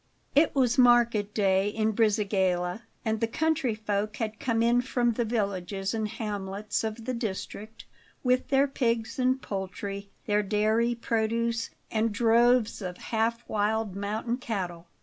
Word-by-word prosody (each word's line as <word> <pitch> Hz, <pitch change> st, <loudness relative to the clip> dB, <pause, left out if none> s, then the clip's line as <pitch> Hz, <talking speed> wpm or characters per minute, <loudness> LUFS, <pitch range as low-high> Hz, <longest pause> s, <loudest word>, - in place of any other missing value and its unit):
IT 295 Hz, +2 st, +4 dB
was 255 Hz, -2 st, +3 dB
market 235 Hz, -4 st, +4 dB
day 195 Hz, -1 st, +2 dB
in 220 Hz, +1 st, 0 dB
Brisighella, 195 Hz, -3 st, +1 dB, 0.2 s
and 220 Hz, -1 st, 0 dB
the 230 Hz, -, +2 dB
country 310 Hz, -2 st, 0 dB
folk 210 Hz, 0 st, -2 dB
had 220 Hz, -2 st, -3 dB
come 230 Hz, -2 st, +1 dB
in 240 Hz, +1 st, +4 dB
from 245 Hz, -1 st, +1 dB
the 235 Hz, +1 st, -1 dB
villages 195 Hz, -3 st, -2 dB
and 220 Hz, -1 st, -1 dB
hamlets 205 Hz, -1 st, -3 dB
of 220 Hz, +1 st, -4 dB
the 255 Hz, -, -2 dB
district 220 Hz, -1 st, -5 dB, 0.4 s
with 255 Hz, 0 st, +2 dB
their 275 Hz, +1 st, +3 dB
pigs 235 Hz, -4 st, -1 dB
and 255 Hz, +1 st, +1 dB
poultry, 200 Hz, +1 st, -5 dB, 0.2 s
their 210 Hz, 0 st, +2 dB
dairy 215 Hz, +3 st, +1 dB
produce 230 Hz, 0 st, -1 dB, 0.2 s
and 220 Hz, 0 st, +1 dB
droves 235 Hz, +1 st, +3 dB
of 180 Hz, -2 st, -5 dB, 0.2 s
half 230 Hz, +1 st, 0 dB
wild 215 Hz, -1 st, 0 dB
mountain 215 Hz, +4 st, -2 dB
cattle. 180 Hz, -8 st, -4 dB
220 Hz, 145 wpm, -28 LUFS, 205-235 Hz, 0.4 s, IT